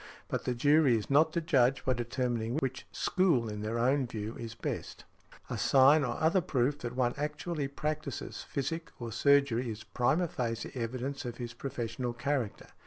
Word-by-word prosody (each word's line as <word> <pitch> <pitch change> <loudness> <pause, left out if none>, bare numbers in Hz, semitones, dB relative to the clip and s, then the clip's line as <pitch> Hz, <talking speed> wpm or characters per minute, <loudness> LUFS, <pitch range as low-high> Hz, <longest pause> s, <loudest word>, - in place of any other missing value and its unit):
But - - -2
the 125 - 0
jury 145 -1 +4
is 105 +4 -5
not 155 +3 +5
to 170 - 0
judge 135 -5 +2
by 130 - +3
determining 120 -1 -2
which 130 -3 -3
school 165 -11 +2
in 105 -1 -5
their 110 +2 -2
own 130 +2 +2
view 110 0 -5
is 115 -1 -6
best. - - -5 0.4
A - - -4
sign 140 +3 +6
or 120 -2 -2
other 165 +4 +3
proof 140 -1 0
that 120 0 -5
one 125 -1 +1
actually 150 +1 -2
practises 150 +2 -4
physic 160 +4 -3
or 120 -2 -5
surgery 140 -2 +3
is 110 0 -6
prima 125 +10 +1
facie 115 -5 -3
evidence 130 +3 -3
of 120 -2 -5
his 120 -1 -5
professional 120 -1 -4
character. 125 -2 -2
130 Hz, 175 wpm, -31 LUFS, 120-145 Hz, 0.4 s, sign